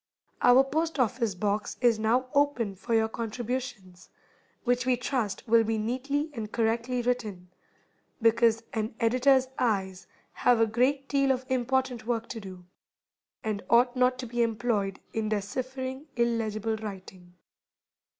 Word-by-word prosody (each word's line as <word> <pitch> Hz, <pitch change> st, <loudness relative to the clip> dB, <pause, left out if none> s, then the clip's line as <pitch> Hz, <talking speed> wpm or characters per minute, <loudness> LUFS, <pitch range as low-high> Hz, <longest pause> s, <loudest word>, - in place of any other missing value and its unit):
Our 245 Hz, +2 st, +7 dB
Post 315 Hz, +4 st, -1 dB
office 230 Hz, -4 st, +1 dB
Box 205 Hz, +2 st, -2 dB
is 235 Hz, -3 st, +3 dB
now 235 Hz, +4 st, +2 dB
open 280 Hz, -8 st, +1 dB
for 220 Hz, +4 st, -2 dB
your 220 Hz, 0 st, +3 dB
contributions, 230 Hz, -4 st, -5 dB, 0.5 s
which 245 Hz, 0 st, +1 dB
we 250 Hz, 0 st, +2 dB
trust 240 Hz, -6 st, -2 dB
will 230 Hz, 0 st, +5 dB
be 220 Hz, 0 st, -1 dB
neatly 275 Hz, +7 st, -2 dB
and 220 Hz, -4 st, -6 dB
correctly 235 Hz, +2 st, 0 dB
written, 215 Hz, -8 st, -2 dB, 0.7 s
because 230 Hz, 0 st, +3 dB
an 220 Hz, 0 st, -2 dB
editor's 255 Hz, +3 st, +3 dB
eyes 190 Hz, -6 st, -1 dB, 0.2 s
have 245 Hz, -2 st, +3 dB
a 225 Hz, -, +5 dB
great 260 Hz, +5 st, +1 dB
deal 275 Hz, -1 st, +2 dB
of 260 Hz, 0 st, -1 dB
important 260 Hz, -2 st, 0 dB
work 235 Hz, -1 st, -1 dB
to 230 Hz, -, -5 dB
do, 185 Hz, -3 st, -10 dB, 0.8 s
and 215 Hz, -2 st, -2 dB
ought 245 Hz, +2 st, +4 dB
not 255 Hz, 0 st, +3 dB
to 255 Hz, -, -5 dB
be 240 Hz, 0 st, -2 dB
employed 225 Hz, -4 st, 0 dB
in 220 Hz, -1 st, -1 dB
deciphering 260 Hz, +6 st, -4 dB
illegible 225 Hz, -2 st, 0 dB
writing. 190 Hz, -4 st, -9 dB
235 Hz, 140 wpm, -28 LUFS, 215-255 Hz, 0.8 s, Our